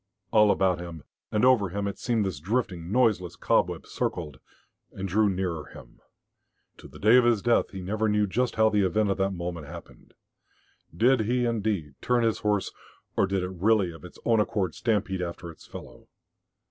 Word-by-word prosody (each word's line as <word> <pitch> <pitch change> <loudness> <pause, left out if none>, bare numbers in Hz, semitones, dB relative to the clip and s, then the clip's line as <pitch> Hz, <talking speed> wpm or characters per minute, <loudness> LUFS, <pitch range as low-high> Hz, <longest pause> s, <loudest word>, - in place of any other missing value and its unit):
All 105 -2 +5
about 95 -3 +2
him, 85 -4 -8 0.3
and 105 +3 +2
over 120 -7 +4
him, 100 +3 -3
it 100 - -5
seemed 115 -4 0
this 90 -7 -3
drifting, 95 - -2
noiseless 105 -8 +2
cobweb - - 0
circled 75 -6 -4 0.5
and 95 0 -5
drew 105 +3 +2
nearer 90 -4 -2
him.... - - -14 0.8
To - - -12
the - - -14
day 110 +5 +5
of 125 - +5
his 120 -4 +2
death 120 -1 +2
he 95 - -7
never 110 +4 -1
knew 105 0 +2
just 120 +5 -1
how 110 0 +4
the 105 -1 +2
event 105 +2 +1
of - - -1
that 95 0 +2
moment 85 -4 -5
happened. - - -12 0.8
Did 125 +5 +4
he, 120 +3 +1
indeed, 105 - -1
turn 125 -1 +1
his 115 -1 +1
horse, 105 -2 0 0.4
or - - +2
did 95 -1 -1
it 90 - -4
really 95 0 +2
of 80 - -13
its 90 - -12
own 115 -2 +3
accord 100 -4 0
stampede 105 -5 -1
after 85 0 -5
its 80 - -17
fellow? - - -11
100 Hz, 185 wpm, -27 LUFS, 90-110 Hz, 0.8 s, All